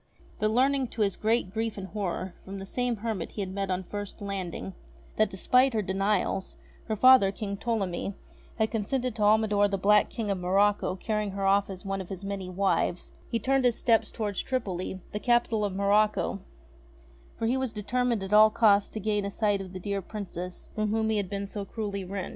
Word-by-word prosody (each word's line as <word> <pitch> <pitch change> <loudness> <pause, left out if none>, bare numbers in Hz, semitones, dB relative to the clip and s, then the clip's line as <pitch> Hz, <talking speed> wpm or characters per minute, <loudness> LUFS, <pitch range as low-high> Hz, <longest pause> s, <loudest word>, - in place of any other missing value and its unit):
But, 215 - +2
learning 265 +3 +2
to 225 -2 -1
his 195 -3 0
great 220 -3 0
grief 225 0 -2
and 195 - -5
horror 190 -3 -3
from 195 +1 -7
the 195 - -6
same 245 +4 -1
hermit 215 -5 -4
he 210 - -4
had 190 -1 -4
met 195 0 -2
on 185 0 -1
first 205 +2 -6
landing, 195 -2 -4 0.4
that, 215 -1 +3
despite 250 +6 +3
her 215 - +1
denials, 195 0 0 0.3
her 220 - -1
father, 255 -3 +7
King 200 -1 -4
Ptolemy, 200 -4 -2 0.4
had 220 -1 +1
consented 245 +2 -1
to 220 - -5
Almidor 210 -1 +4
the 200 -1 -1
black 210 +2 +4
King 215 -3 -3
of 195 - -1
Morocco 195 +1 +2
carrying 210 0 -2
her 195 0 -2
off 200 +1 +3
as 185 -1 -8
one 195 0 -2
of 185 - -9
his 195 0 -7
many 195 -2 -4
wives, 185 -1 0 0.2
he 230 - 0
turned 265 +4 +1
his 245 -2 +3
steps 230 -2 +2
towards 205 -4 -2
Tripoli, 190 -7 -3
the 210 - -3
capital 240 -2 +2
of 205 - 0
Morocco; 200 0 +2 1.0
for 225 - -2
he 240 +3 +2
was 260 -3 -1
determined 230 +1 -1
at 195 +2 -4
all 215 +1 +8
costs 205 -2 +4
to 220 - -6
gain 210 0 0
a 200 - -2
sight 205 -1 0
of 185 -2 -8
the 185 - -6
dear 200 +1 -2
Princess 180 -3 -6
from 215 0 -1
whom 220 +1 +1
he 215 - +1
had 200 -3 -2
been 200 0 -3
so 200 0 -5
cruelly 200 -1 -4
rent. 190 0 -4
205 Hz, 205 wpm, -28 LUFS, 195-220 Hz, 1.0 s, all